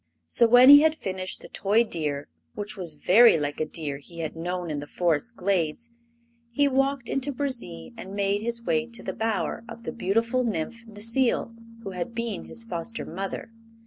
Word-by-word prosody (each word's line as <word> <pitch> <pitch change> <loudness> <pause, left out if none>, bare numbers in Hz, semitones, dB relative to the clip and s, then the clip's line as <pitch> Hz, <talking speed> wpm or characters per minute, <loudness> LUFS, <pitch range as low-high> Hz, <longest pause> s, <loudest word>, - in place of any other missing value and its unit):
So 235 - +5
when 245 +3 +8
he 285 +1 +11
had 315 0 +3
finished 185 -8 -4
the - - -10
toy 210 +4 +2
deer, 150 -9 -3 0.3
which 210 +1 -3
was 175 -6 -1
very 210 +7 +6
like 145 -1 -3
a 155 - -1
deer 150 -3 -4
he 170 +4 -12
had 160 0 -4
known 175 0 -3
in 145 - -2
the 145 - -7
Forest 175 +8 -1
glades, 190 +4 -1 0.6
he 285 +5 +2
walked 270 -2 0
into 275 +3 -1
Burzee 235 - -4
and 195 +1 -8
made 200 0 0
his 235 +1 -2
way 235 0 0
to 235 -1 -9
the - - -4
bower 220 -1 -2
of 230 0 -10
the - - -4
beautiful 230 +3 0
Nymph 230 +2 -3
Necile, 230 +3 0 0.3
who 195 - -5
had 180 +5 -5
been 230 -3 -3
his 230 - -4
foster 230 +2 -5
mother. 195 +5 -5
215 Hz, 185 wpm, -26 LUFS, 170-235 Hz, 0.6 s, he